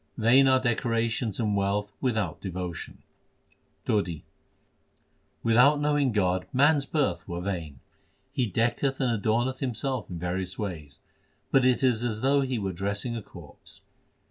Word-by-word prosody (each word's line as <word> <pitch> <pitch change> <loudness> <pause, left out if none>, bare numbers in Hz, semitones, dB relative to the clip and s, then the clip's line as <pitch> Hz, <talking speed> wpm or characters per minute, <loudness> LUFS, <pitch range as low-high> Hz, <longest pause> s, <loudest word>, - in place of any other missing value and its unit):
Vain 125 +4 +5
are 130 0 +5
decorations 115 -2 -1
and 105 -3 +1
wealth 100 +1 -1
without 110 - -1
devo 90 -2 -4
tion: - - -10 0.8
TODI 90 -7 -1 1.2
Without 125 +6 +5
knowing 145 -3 +2
God 95 -3 0
man 145 +4 +4
s 140 - -2
birth 130 - -1
were 85 0 -4
vain: 85 -8 -5 0.5
He 125 - 0
decketh 120 +6 0
and 130 -2 +1
adorneth 120 +5 0
himself 130 -2 -3
in 90 - -5
various 90 +2 -3
ways, 80 -9 -6 0.5
but 135 -2 +4
it 130 +1 +3
is 120 -3 +2
as 110 -3 -2
though 140 +1 +3
he 130 -2 -1
were 95 -3 -2
dressing 100 +6 -3
a 115 - -4
corpse. - - -14
115 Hz, 145 wpm, -27 LUFS, 95-130 Hz, 1.2 s, Vain